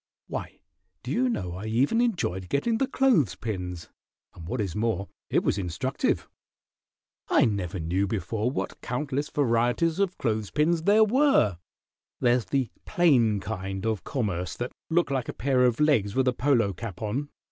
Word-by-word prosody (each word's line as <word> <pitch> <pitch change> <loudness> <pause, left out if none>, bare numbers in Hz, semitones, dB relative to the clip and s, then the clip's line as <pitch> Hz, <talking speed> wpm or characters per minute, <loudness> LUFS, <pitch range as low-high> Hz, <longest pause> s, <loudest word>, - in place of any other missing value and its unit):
Why, - - -6 0.5
do - - -5
you 255 +2 +2
know 90 - -2
I 95 +4 -6
even 135 - +2
enjoyed 95 - -1
getting 225 +11 +1
the 270 - +2
clothes 225 - +3
pins, 90 -5 -5 0.4
and 80 - -10
what 125 +7 -3
is 95 -5 -2
more, 105 -3 -1 0.2
it - - +2
was 100 - +1
instructive. 95 +9 -1 1.0
I - - +5
never 100 -4 -2
knew 90 +5 0
before 105 +4 -1
what 130 - -4
countless 140 +3 -2
varieties 125 +6 +1
of 195 -2 0
clothes 110 -4 -1
pins 160 +2 +1
there 210 +2 +6
were. 225 - +3 0.6
There's 120 -1 +2
the 135 -4 -1
plain 120 -12 +3
kind 95 -1 -4
of 110 -4 -1
commerce 90 -8 -2
that 120 +1 -3 0.2
look 170 -2 +2
like 130 -3 -1
a - - -3
pair 125 +1 +2
of 120 -2 +1
legs 125 -10 +2
with 130 0 +2
a 125 - +3
polo 120 -7 +2
cap 95 -1 -7
on. 130 +8 -2
120 Hz, 165 wpm, -27 LUFS, 100-145 Hz, 1.0 s, there